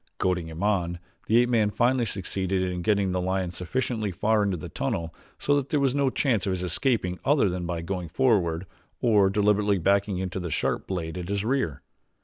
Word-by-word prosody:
Goading 90 -3 0
him 80 +3 -6
on 90 -5 +1 0.3
the 110 - +4
ape 120 0 +4
man 110 -4 +3
finally 120 +3 +2
succeeded 95 -2 -1
in 90 -1 -2
getting 100 -1 +1
the 90 0 -1
lion 95 -1 -1
sufficiently 110 +3 -2
far 105 +4 +1
into 100 -3 0
the 75 - -7
tunnel 80 -1 -3 0.2
so 145 - +1
that 140 -1 -2
there 150 - +1
was 135 -2 +2
no 140 -1 +2
chance 120 -7 0
of 95 - +1
his 90 -1 -3
escaping 90 - 0
other 140 -7 +3
than 90 -1 -3
by 85 -1 -3
going 90 0 -3
forward 95 -7 +1 0.3
or 105 -5 +4
deliberately 105 0 +2
backing 100 +2 +1
into 95 0 -3
the 90 -1 -4
sharp - - -1
blade 90 -2 -3
at 90 +1 -6
his 100 0 -1
rear. 120 - -1
95 Hz, 200 wpm, -26 LUFS, 90-110 Hz, 0.3 s, the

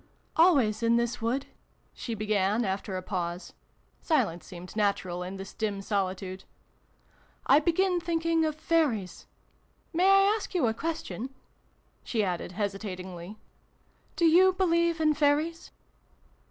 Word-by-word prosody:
"Always, 275 - +4
in 230 0 +3
this 235 0 0
wood," 250 +5 -1 0.5
she 230 - -5
began 210 +1 +1
after 190 0 -3
a 185 - -5
pause 175 -2 -4 0.5
(silence 205 - 0
seemed 180 +2 -10
natural 200 -4 0
in 185 +2 -5
this 195 0 -8
dim 210 -3 -2
solitude), 190 -2 -3 0.5
" - - -35
I - - +7
begin 355 +3 +1
thinking 330 -1 0
of 310 -1 0
Fairies! 310 - 0 0.7
May 360 +4 +4
I 390 +1 +6
ask 420 -3 -6
you 340 - +3
a 220 - +1
question? 315 -4 -4 0.4
" - - -39
she 225 -3 0
added 180 -1 -3
hesitatingly. 190 -2 -5 0.4
" - - -37
Do 340 - +2
you 365 +4 +6
believe 340 -2 +2
in 310 -1 +3
Fairies 305 +3 +1
230 Hz, 140 wpm, -28 LUFS, -, 0.7 s, I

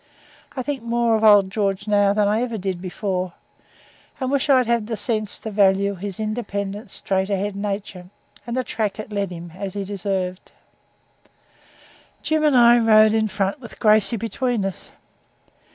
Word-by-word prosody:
I 255 - -2
think 280 -1 -3
more 235 0 +1
of 220 - -1
old 205 -3 +6
George 200 -1 -1
now 205 -1 +3
than 205 0 +2
I 215 +3 +1
ever 235 -2 -2
did 185 -2 -4
before, 185 -1 -3 0.9
and 260 -1 -2
wish 280 +1 0
I'd 260 -2 +5
had 235 -2 0
the 225 -2 -3
sense 215 -1 -1
to 220 - -5
value 200 0 +3
his 195 +1 -6
independent 210 -2 -4
straight 190 0 -1
ahead 200 0 -2
nature, 200 -3 -5 0.4
and 235 +1 -3
the 255 - 0
track 215 -4 -3
it 215 0 -7
led 200 -2 -2
him, 170 -1 -9
as 195 0 -6
he 200 - -2
deserved. 190 -2 -4 1.7
Jim 310 0 0
and 295 -4 +4
I 240 0 +7
rode 215 -1 +5
in 220 -1 +2
front, 200 +5 -2
with 230 - -11
Gracey 215 0 +3
between 230 0 -2
us. 195 - -6
210 Hz, 170 wpm, -22 LUFS, 195-230 Hz, 1.7 s, I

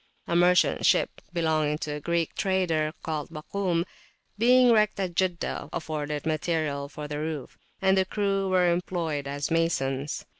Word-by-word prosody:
A 170 - -1
merchant 180 +1 +4
ship - - +2
belonging 155 -3 +1
to 155 -1 -4
a 150 - -4
Greek 170 +1 -1
trader, 175 -5 0
called 155 -2 -3
Bakum 155 -2 -7 0.4
([Arabic]), 175 - -5 0.5
being 245 +3 +5
wrecked 215 -3 +3
at 185 -3 -2
Jeddah, 180 -1 -1
afforded 150 -2 -4
material 155 -3 -1
for 150 0 -7
the 150 0 -4
roof, 155 -4 -4 0.3
and 190 0 +5
the 190 -1 +3
crew 195 -1 0
were 180 -2 +3
employed 170 -5 -2
as 145 +2 -3
masons. 145 -4 0
165 Hz, 155 wpm, -27 LUFS, 150-185 Hz, 0.5 s, being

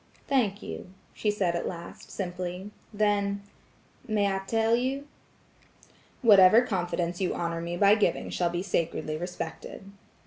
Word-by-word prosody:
"Thank 225 -7 +1
you," - - -7 0.2
she 215 - -1
said 190 -4 0
at 170 - -2
last, 170 -1 -8
simply. 180 +1 -5 0.2
Then– 200 -1 +1 0.6
"May 205 -3 +1
I 195 - -1
tell 225 0 +3
you?" 265 +4 -2 1.2
"Whatever 210 +1 +8
confidence 175 -4 -2
you 185 - 0
honor 170 -1 -2
me 170 +1 -4
by 200 +2 +6
giving 215 -1 +1
shall 175 -1 +1
be 175 +1 -2
sacredly 165 -4 -1
respected." 180 +3 -6
195 Hz, 135 wpm, -28 LUFS, 175-210 Hz, 1.2 s, Whatever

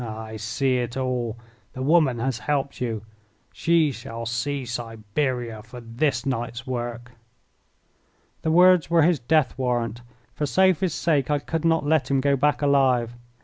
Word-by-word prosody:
Ah, 110 -1 -6
I 110 0 -8
see 125 +5 0
it 120 0 -3
all! 125 -3 -2 0.4
The 130 - -5
woman 150 -4 +3
has 120 0 -2
helped 140 -2 -2
you. 115 -4 -2 0.5
She 165 -3 +2
shall 115 -2 -7
see 130 +4 -2
Siberia 120 0 -3
for 110 +3 -11
this 120 +2 -1
night's 120 -2 -3
work." 120 -1 -5 1.3
The 160 - -1
words 180 0 +5
were 170 -2 +4
his 170 -2 +3
death 145 +3 +1
warrant. 120 -2 -1 0.3
For 150 - -2
Sophie's 185 +2 +2
sake 150 -5 +1
I 150 - +2
could 160 +3 -3
not 165 -2 +2
let 150 -3 +2
him 135 -1 +2
go 140 +1 +2
back 145 +2 +1
alive. 130 -4 +3
130 Hz, 155 wpm, -24 LUFS, 120-150 Hz, 1.3 s, words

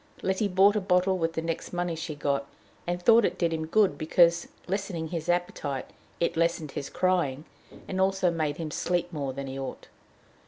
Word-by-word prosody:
Letty 190 +2 +1
bought 195 +2 +5
a 210 - +1
bottle 185 0 +2
with 165 0 0
the 160 - -3
next 165 0 -3
money 175 -1 -1
she 160 -1 -5
got, 140 -1 -1 0.4
and 175 0 -1
thought 230 +5 +6
it - - 0
did 170 -2 +1
him 160 -1 -3
good 205 +2 +3
because, 170 +2 +4 0.2
lessening 185 -4 -3
his 170 0 -4
appetite, 165 -6 -1 0.3
it 170 - 0
lessened 165 -3 0
his 140 - -5
crying, 170 -6 0 0.4
and 190 0 -1
also 190 -2 +2
made 155 -3 -1
him 160 -2 -4
sleep 175 +1 -1
more 140 -3 -2
than 140 +1 -5
he 135 0 -6
ought. 135 - -7
170 Hz, 190 wpm, -28 LUFS, 155-185 Hz, 0.4 s, thought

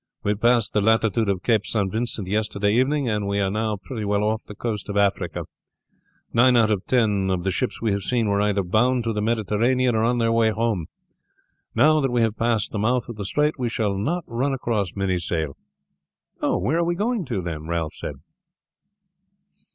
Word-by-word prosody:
We 105 - +1
passed 115 0 +2
the 105 - +2
latitude 110 0 +2
of 95 -2 -1
Cape 110 -4 +2
St. 100 -5 0
Vincent 110 -3 -2
yesterday 105 0 0
evening, 135 +3 +1
and 105 -2 -1
we 100 0 0
are 95 -1 +1
now 110 0 -1
pretty 110 +3 -6
well 100 0 0
off 110 +1 0
the 105 - -11
coast 105 -2 -4
of 100 - -2
Africa. 100 -1 0 0.9
Nine 125 +1 +5
out 110 -2 +4
of 100 -3 0
ten 105 -6 +2
of 90 -2 -1
the 95 - 0
ships 125 +4 -2
we 110 - +2
have 100 0 -1
seen 115 +2 0
were 100 0 +1
either 105 -1 +1
bound 120 +7 +2
to 115 -1 -1
the 105 - -2
Mediterranean 115 +3 +1
or 110 - +1
on 120 +1 +2
their 115 -1 +2
way 115 -1 +3
home. 110 -6 -1 0.9
Now 155 +1 +5
that 135 -2 +1
we 120 -1 +1
have 115 -1 +1
passed 115 -2 0
the 105 - -3
mouth 120 +3 0
of 120 - -6
the 105 -1 -5
strait 150 +7 0
we 125 -2 0
shall 105 -3 -1
not 160 - -1
run 130 +4 -1
across 110 -8 -2
many 95 -2 0
sail." 80 -4 -2 0.9
"Where 160 +6 +1
are - - +2
we 175 +1 0
going 220 +2 -1
to, 110 -9 -3
then?" 80 -2 -5
Ralph 85 -2 -2
said. 75 - -6
110 Hz, 205 wpm, -23 LUFS, 100-120 Hz, 0.9 s, Nine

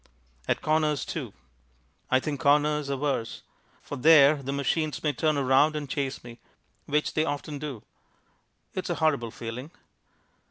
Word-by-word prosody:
At - - 0
corners, 155 -2 +1
too. - - -5 0.8
I 130 - +4
think 145 +1 -4
corners 150 +1 +2
are 140 - -1
worse. 135 -5 -2 0.4
For - - -6
there 145 +1 +6
the 135 0 -4
machines 140 +2 -1
may 150 -2 +1
turn 155 +1 +1
around 140 +3 +3
and 150 -1 -4
chase 135 0 -3
me, 120 -1 -11 0.5
which 150 +1 0
they 155 - +2
often 145 -1 -4
do. 140 -7 -6 0.9
It's - - -4
a - - 0
horrible 140 -7 +1
feeling. 120 +5 -7
145 Hz, 150 wpm, -27 LUFS, 135-150 Hz, 0.9 s, there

